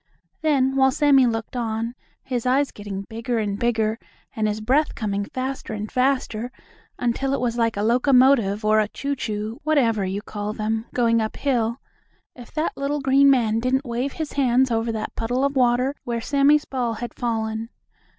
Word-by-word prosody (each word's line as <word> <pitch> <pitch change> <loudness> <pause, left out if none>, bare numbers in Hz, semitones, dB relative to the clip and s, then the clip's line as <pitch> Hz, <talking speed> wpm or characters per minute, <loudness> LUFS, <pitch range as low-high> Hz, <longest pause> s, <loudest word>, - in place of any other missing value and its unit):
Then 270 -4 +2
while 265 0 +5
Sammie 275 -2 +4
looked 225 +1 -3
on, 230 -1 -2 0.3
his 250 -2 -3
eyes 275 +2 +2
getting 200 -1 -6
bigger 230 +3 -3
and 205 -2 -2
bigger 225 -2 0 0.4
and 215 -1 0
his 210 0 -2
breath 265 +8 +1
coming 205 -2 -2
faster 260 0 -4
and 210 0 -5
faster, 250 -3 0 0.5
until 265 +3 0
it - - -3
was 240 -2 -1
like 230 -2 0
a 205 - 0
locomotive 245 -3 +3
or 215 0 +4
a 215 - +2
choo 280 +6 -3
choo, 215 -2 -4
whatever 245 -9 +2
you 195 +2 -3
call 210 0 -4
them, 220 +1 -2
going 230 -2 +2
up 220 - -3
hill, 240 -3 0 0.6
if 245 -2 -12
that 310 +1 -1
little 285 +1 -2
green 275 +1 +4
man 225 -5 +3
didn't 260 +3 0
wave 245 +3 -2
his 315 -2 -5
hands 260 -2 +2
over 225 0 0
that 220 -1 -5
puddle 245 +4 0
of 280 0 -1
water, 250 +1 +2
where 235 -1 -2
Sammie's 285 +4 +3
ball 245 -4 -2
had 240 +2 -6
fallen. 225 -1 -2
240 Hz, 180 wpm, -23 LUFS, 220-265 Hz, 0.6 s, while